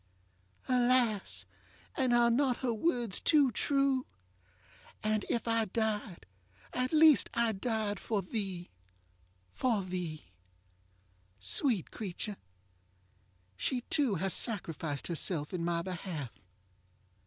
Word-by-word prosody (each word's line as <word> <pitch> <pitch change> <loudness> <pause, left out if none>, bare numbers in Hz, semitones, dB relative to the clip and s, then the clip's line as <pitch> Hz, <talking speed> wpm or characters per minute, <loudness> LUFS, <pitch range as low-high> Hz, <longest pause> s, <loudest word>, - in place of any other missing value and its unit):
ŌĆØ - - -23
Alas! 245 -4 +2 0.5
and 260 -4 +1
are 240 0 +5
not 255 0 +2
her 240 - +1
words 235 - 0
too 290 -5 +4
true? 275 +2 +1 1.0
ŌĆ£And 215 0 0
if 235 - -1
I 230 -1 +2
died, 215 - -2 0.5
at 255 0 -1
least 315 -2 +6
I 235 -1 +3
died 215 -1 -2
For 210 -4 -2
theeŌĆöfor 180 - -18
thee. 190 -6 -3 0.9
ŌĆØ 185 -9 -1 1.2
Sweet 205 - +2
creature! 205 0 -5 1.2
she 250 - -1
too 275 -9 +2
has 190 +2 0
sacrificed 165 - 0
herself 165 -2 -2
in 175 -2 -2
my 170 0 0
behalf. 175 - -5
215 Hz, 110 wpm, -32 LUFS, 180-245 Hz, 1.2 s, least